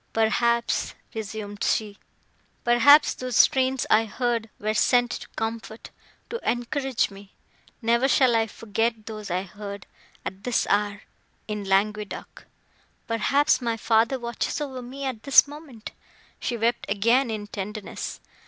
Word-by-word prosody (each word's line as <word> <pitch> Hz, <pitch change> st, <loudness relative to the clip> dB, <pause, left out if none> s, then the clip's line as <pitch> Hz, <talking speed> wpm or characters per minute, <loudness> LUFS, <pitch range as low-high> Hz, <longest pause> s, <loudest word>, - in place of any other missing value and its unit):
"Perhaps," 235 Hz, +2 st, +1 dB, 0.2 s
resumed 210 Hz, -2 st, -5 dB
she, 210 Hz, -2 st, 0 dB, 0.6 s
"perhaps, 240 Hz, +5 st, +6 dB
those 255 Hz, -2 st, -3 dB
strains 260 Hz, -1 st, +4 dB
I 225 Hz, +1 st, +5 dB
heard 230 Hz, 0 st, -2 dB
were 215 Hz, +1 st, -1 dB
sent 245 Hz, +2 st, +3 dB
to -, -, -6 dB
comfort,—to 225 Hz, -, -7 dB
encourage 245 Hz, +1 st, -1 dB
me! 195 Hz, 0 st, -14 dB, 0.5 s
Never 235 Hz, +3 st, +3 dB
shall 260 Hz, -3 st, +4 dB
I 225 Hz, 0 st, +2 dB
forget 225 Hz, +1 st, -2 dB
those 215 Hz, -2 st, -7 dB
I 180 Hz, +1 st, -1 dB
heard, 200 Hz, +1 st, -8 dB, 0.4 s
at 190 Hz, +1 st, -6 dB
this 245 Hz, 0 st, +1 dB
hour, 205 Hz, 0 st, 0 dB, 0.4 s
in 210 Hz, -2 st, -4 dB
Languedoc! 205 Hz, +2 st, -1 dB, 0.6 s
Perhaps, 275 Hz, +6 st, +2 dB
my 230 Hz, -2 st, -1 dB
father 225 Hz, +3 st, +2 dB
watches 235 Hz, +2 st, -3 dB
over 265 Hz, -4 st, -5 dB
me, 265 Hz, +3 st, -7 dB
at 255 Hz, -5 st, -3 dB
this 275 Hz, +2 st, +6 dB
moment!" 285 Hz, -6 st, -10 dB, 0.5 s
She 240 Hz, -, -2 dB
wept 235 Hz, +2 st, 0 dB
again 230 Hz, +6 st, +3 dB
in 215 Hz, -2 st, -4 dB
tenderness. 205 Hz, 0 st, -6 dB
225 Hz, 130 wpm, -25 LUFS, 210-245 Hz, 0.6 s, perhaps